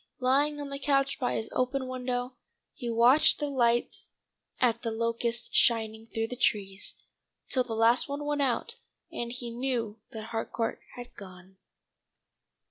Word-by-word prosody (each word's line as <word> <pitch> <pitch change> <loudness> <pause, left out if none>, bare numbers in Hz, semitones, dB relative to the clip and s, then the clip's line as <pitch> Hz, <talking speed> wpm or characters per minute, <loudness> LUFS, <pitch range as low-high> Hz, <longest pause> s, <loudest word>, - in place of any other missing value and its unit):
Lying 285 +3 +2
on 285 -1 -5
the 275 - -4
couch 275 0 +1
by 250 - 0
his 220 - -3
open 255 +1 0
window, 250 0 -3 0.4
he 240 -3 -5
watched 240 +6 +5
the 295 - -2
lights 240 -3 +1 0.5
at 235 -2 +2
The 230 - -2
Locusts 230 +1 -2
shining 225 -1 +3
through 225 0 -2
the 250 - -4
trees, 200 -5 -1 0.5
till 255 - +3
the 235 -2 -5
last 230 +4 +4
one 285 +1 -4
went 295 0 0
out, 275 - 0 0.3
and 235 0 -4
he 240 -1 -4
knew 235 -3 -2
that 220 0 -8
Harcourt 225 0 -2
had 245 -1 -9
gone. 185 -1 -13
240 Hz, 150 wpm, -29 LUFS, 225-265 Hz, 0.5 s, watched